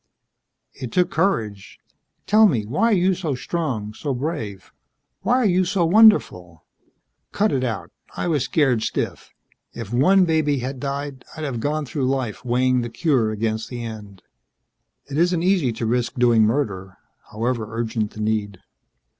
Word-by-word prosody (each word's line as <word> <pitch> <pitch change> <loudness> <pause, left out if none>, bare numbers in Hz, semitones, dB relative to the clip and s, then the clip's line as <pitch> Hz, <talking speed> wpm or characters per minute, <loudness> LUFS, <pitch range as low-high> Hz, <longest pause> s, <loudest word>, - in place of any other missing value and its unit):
"It 125 -3 -7
took 180 +5 +1
courage. 110 - -1 0.5
Tell 215 +1 +6
me: 115 - 0
why 150 - 0
are 230 - +3
you 185 +1 +3
so 165 -6 -3
strong, 125 -8 -3
so 140 +4 -3
brave? 120 - -5 0.5
Why 245 - +2
are 255 -2 +2
you 185 -2 +3
so 180 -1 +1
wonderful?" 165 - +4 0.7
"Cut 210 +1 +1
it 130 -2 0
out. 115 -6 -3 0.3
I - - -2
was 150 -6 +1
scared 135 -7 +1
stiff. - - -3 0.4
If 115 -1 -7
one 185 +10 +4
baby 155 -3 +1
had 130 +1 -4
died, 140 0 -4
I'd 155 - -5
have 135 -6 -3
gone 150 +4 -1
through 130 +1 -2
life 130 -5 -2
weighing 125 +1 +2
the 120 - -4
cure 130 -3 +1
against 110 +1 -2
the 120 -2 -6
end. 105 -4 -9 0.8
It 140 +2 -3
isn't 175 0 +2
easy 180 -9 +2
to 115 - -4
risk 120 +1 -1
doing 120 -3 +4
murder 100 -6 -2 0.3
however 115 0 -2
urgent 115 -2 -2
the 110 - -6
need." 105 -2 -1
130 Hz, 160 wpm, -22 LUFS, 110-160 Hz, 0.8 s, Tell